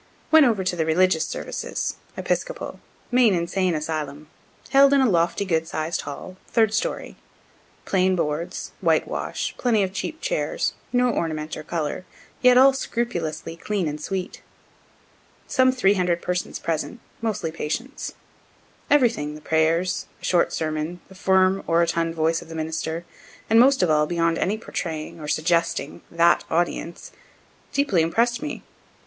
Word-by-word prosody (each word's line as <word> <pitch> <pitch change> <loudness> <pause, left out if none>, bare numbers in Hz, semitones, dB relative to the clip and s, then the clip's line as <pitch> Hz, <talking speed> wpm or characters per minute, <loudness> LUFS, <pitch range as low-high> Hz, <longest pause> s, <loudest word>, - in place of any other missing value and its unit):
Went 315 -3 +8
over 215 -5 +1
to 180 -1 -1
the 165 - 0
religious 160 +1 +2
services - - -4 0.2
(Episcopal) - - -3 0.3
main 245 -5 +5
Insane 175 +1 0
asylum, 150 -1 -4 0.4
held 275 0 +6
in 280 - +5
a 260 - +4
lofty, 170 0 +1
good 165 -3 0
sized 155 +2 -2
hall, 185 +6 -8
third 220 -2 +2
story. 225 - -2 0.7
Plain 185 -1 +2
boards, 170 +2 -3
whitewash, - - 0
plenty 225 -5 +2
of 190 0 -3
cheap 310 +11 -4
chairs, - - -1 0.2
no 245 0 +3
ornament 155 -5 -2
or - - -6
color, 155 +1 -3 0.4
yet 250 -1 +6
all 270 +1 +7
scrupulously 230 - -3
clean 190 0 -2
and 150 0 -4
sweet. 190 +2 -4 1.0
Some 260 -1 +3
three 225 -6 +3
hundred 180 -3 0
persons 180 0 -2
present, 165 +8 -3 0.2
mostly 215 -8 -2
patients. 235 - -4 0.7
Everything, 235 - +2
the - - -9
prayers, 160 +3 +1
a - - -8
short 175 -2 +3
sermon, 155 +2 -3
the - - -13
firm, 190 0 +3
orotund 165 0 +1
voice 165 +1 +1
of - - -13
the 165 - -7
minister, 160 +1 -3 0.5
and 225 - +7
most 265 -3 +5
of 170 - +3
all, 150 0 +3
beyond 165 -1 +1
any 205 +3 0
portraying, 165 -7 -5
or 150 - -7
suggesting, 160 -2 0
that 170 0 +3
audience, 170 0 -2 0.6
deeply 280 - +2
impress'd 235 +9 +1
me. 300 - -5
175 Hz, 145 wpm, -24 LUFS, 160-225 Hz, 1.0 s, Went